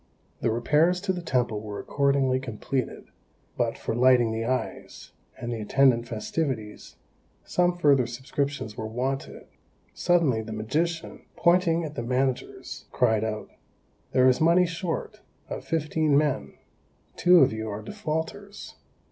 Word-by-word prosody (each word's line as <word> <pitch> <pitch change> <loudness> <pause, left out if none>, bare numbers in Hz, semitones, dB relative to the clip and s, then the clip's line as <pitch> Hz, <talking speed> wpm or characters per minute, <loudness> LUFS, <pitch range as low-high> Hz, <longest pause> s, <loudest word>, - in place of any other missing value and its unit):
The - - 0
repairs 150 +10 +2
to 195 -1 0
the 180 - -4
temple 125 -9 0
were 105 -1 -6
accordingly 140 -2 +1
completed, 130 +1 -4 0.5
but - - -1
for - - -3
"lighting 120 -1 +4
the 110 0 -2
eyes," 130 +1 -4 0.3
and 120 - -5
the 115 - -4
attendant 120 +1 +3
festivities, 115 -1 -4 0.5
some 175 0 +1
further 140 -7 +4
subscriptions 130 -1 -3
were 110 - -4
wanted. 130 +4 -4 0.5
Suddenly, 165 -10 +2
the 110 0 -7
magician, 160 +10 -2
pointing 170 -1 +3
at 150 -2 -5
the 120 - -4
managers, 125 +2 -2
cried 110 -3 +2
out, 110 -1 -4 0.6
"There 130 0 +4
is 130 +2 +3
money 170 +3 +5
short; 180 +5 -4 0.3
of - - -5
fifteen 155 -2 +1
men, 140 - 0 0.6
two 180 -1 +6
of 130 - +4
you 110 0 -4
are 105 +1 -5
defaulters." 200 - -5
135 Hz, 135 wpm, -26 LUFS, 115-165 Hz, 0.6 s, two